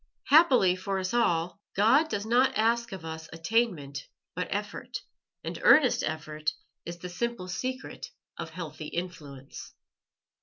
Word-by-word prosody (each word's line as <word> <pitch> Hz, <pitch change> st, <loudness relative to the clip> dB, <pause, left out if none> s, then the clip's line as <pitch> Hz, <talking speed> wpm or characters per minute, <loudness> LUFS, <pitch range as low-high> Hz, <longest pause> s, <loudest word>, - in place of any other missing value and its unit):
Happily 265 Hz, -, +6 dB
for 195 Hz, +1 st, -2 dB
us 185 Hz, +2 st, -2 dB
all, 175 Hz, -7 st, +1 dB, 0.2 s
God 265 Hz, +11 st, +5 dB
does 205 Hz, -5 st, -2 dB
not 245 Hz, +1 st, +3 dB
ask 230 Hz, +2 st, +2 dB
of 190 Hz, -4 st, -7 dB
us 160 Hz, 0 st, -7 dB
attainment, 165 Hz, -5 st, -1 dB, 0.3 s
but -, -, -3 dB
effort, -, -, -4 dB, 0.4 s
and -, -, -5 dB
earnest -, -, +6 dB
effort 155 Hz, 0 st, -2 dB, 0.3 s
is 170 Hz, 0 st, -5 dB
the 175 Hz, +1 st, -7 dB
simple 185 Hz, +1 st, -3 dB
secret 255 Hz, +8 st, -4 dB, 0.3 s
of -, -, -6 dB
healthy 160 Hz, -2 st, -7 dB
influence. 150 Hz, -7 st, -7 dB
185 Hz, 130 wpm, -29 LUFS, 160-235 Hz, 0.4 s, Happily